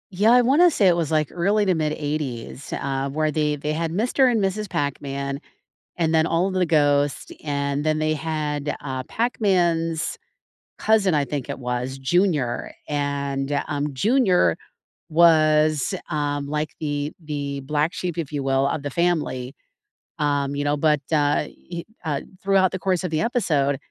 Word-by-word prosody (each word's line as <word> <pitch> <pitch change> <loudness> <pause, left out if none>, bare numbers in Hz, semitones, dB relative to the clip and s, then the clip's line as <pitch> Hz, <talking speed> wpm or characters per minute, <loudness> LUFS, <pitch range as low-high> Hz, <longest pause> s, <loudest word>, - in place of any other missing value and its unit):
Yeah, 205 +5 +4
I 250 - +7
wanna 290 +9 +5
say 210 - +3
it 175 - +3
was, 165 -4 -1
like, 155 -2 +1
early 200 +4 +1
to 190 - +3
mid 155 -2 0
80s, 145 -4 -4
uh, 135 0 -2
where 155 +2 0
they 150 -1 0
they 150 +1 -3
had 160 +1 -2
Mr. 250 +6 +3
and 230 -3 +1
Mrs. 200 +1 -1
Pac-Man, 140 -1 -3 0.6
and 165 -2 +1
then 160 0 +4
all 170 +3 +1
of 195 - -3
the 185 -1 +2
ghosts, 145 -3 +2
and 140 0 -1
then 155 0 +1
they 155 0 +1
had, 150 -2 -2
uh, 130 -2 -4
Pac-Man's 175 - 0 0.6
cousin 210 -5 +3
I 145 -2 +2
think 140 -2 -4
it - - -4
was, 125 +1 -3
Junior, 145 -4 0
and, 140 -1 -2 0.2
um, 145 -1 -2
Junior 185 - +3 0.5
was, 155 -3 +4 0.2
um, 145 -1 -1
like 150 +1 -3
the 145 -1 -2
the 140 -2 -4
black 150 +4 -1
sheep, 175 -2 -4
if 160 -5 -3
you 145 -2 -3
will, 135 0 +2
of 145 - -2
the 145 - -4
family, 150 -6 -1 0.7
um, 145 -2 0
you 145 0 -2
know, 145 0 +2
but, 150 0 +2
uh, 145 -1 +3
he, 170 +3 -9 0.2
uh, 150 -4 -1 0.2
throughout 190 -1 +3
the 190 - -3
course 185 -1 0
of 180 - -3
the 155 0 0
episode, 150 - +1
155 Hz, 170 wpm, -23 LUFS, 140-175 Hz, 0.7 s, I